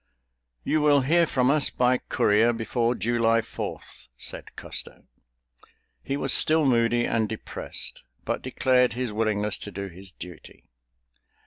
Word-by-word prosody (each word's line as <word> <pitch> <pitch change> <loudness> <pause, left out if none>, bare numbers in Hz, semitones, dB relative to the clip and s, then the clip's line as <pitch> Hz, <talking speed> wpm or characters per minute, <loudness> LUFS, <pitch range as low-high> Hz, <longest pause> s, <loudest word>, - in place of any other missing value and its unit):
"You 155 - +1
will 145 -2 +4
hear 165 +5 +3
from 130 -2 +2
us 145 -2 +2
by 125 0 +2
courier 110 +3 +2
before 115 +1 -1
July 115 +1 +2
Fourth," 65 -10 -7
said - - -8
Custer. - - -6 1.0
He 140 - -3
was - - +2
still 155 -1 +5
moody 120 -2 +2
and 110 -2 0
depressed, 110 - -5 0.2
but - - -2
declared 125 -1 +2
his 125 -2 -3
willingness 105 -1 -1
to - - -6
do 100 0 -6
his 95 +2 -11
duty. 90 -2 -12
120 Hz, 135 wpm, -25 LUFS, 105-130 Hz, 1.0 s, still